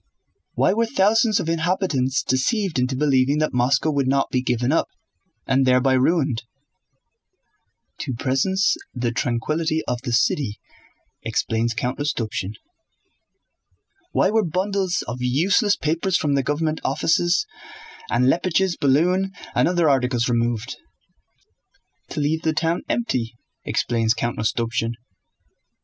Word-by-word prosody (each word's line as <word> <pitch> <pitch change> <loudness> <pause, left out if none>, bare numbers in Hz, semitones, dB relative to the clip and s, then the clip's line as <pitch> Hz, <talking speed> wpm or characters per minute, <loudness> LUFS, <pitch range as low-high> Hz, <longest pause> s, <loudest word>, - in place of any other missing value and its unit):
Why - - +3
were 230 +2 +1
thousands 220 -1 +3
of - - -3
inhabitants 165 -6 0
deceived 175 - 0
into 125 +1 0
believing 135 0 +2
that 155 0 0
Moscow 130 +5 +2
would 140 -3 0
not 135 +1 +1
be 130 - +1
given 125 0 0
up—and 155 -4 -2
thereby 130 +1 +3
ruined?" 135 -2 +1 1.6
"To 130 - -4
preserve 135 +10 0 0.4
the 120 -1 -1
tranquillity 155 +7 -1
of 125 -1 -2
the 125 -2 -4
city," 115 -2 +1 0.6
explains 115 +1 -1
Count 125 +3 -2
Rostopchín. 110 -8 -2 1.6
"Why 190 - +2
were 220 0 +2
bundles 185 +2 -1
of 115 - -4
useless 185 - +2
papers 170 +4 0
from 145 -2 0
the 140 - +2
government 155 +3 -1
offices, 170 - +1 0.6
and 125 - +2
Leppich's 175 +5 +1
balloon 175 +8 +2 0.2
and - - +3
other 175 -2 +2
articles 125 -3 +1
removed?" 120 0 -1 1.3
"To - - -4
leave 155 +2 0
the 160 -1 0
town 165 +2 0
empty," 120 - -1 0.3
explains 115 -1 0
Count 120 0 -3
Rostopchín. 115 +1 -1
140 Hz, 120 wpm, -22 LUFS, 125-170 Hz, 1.6 s, Why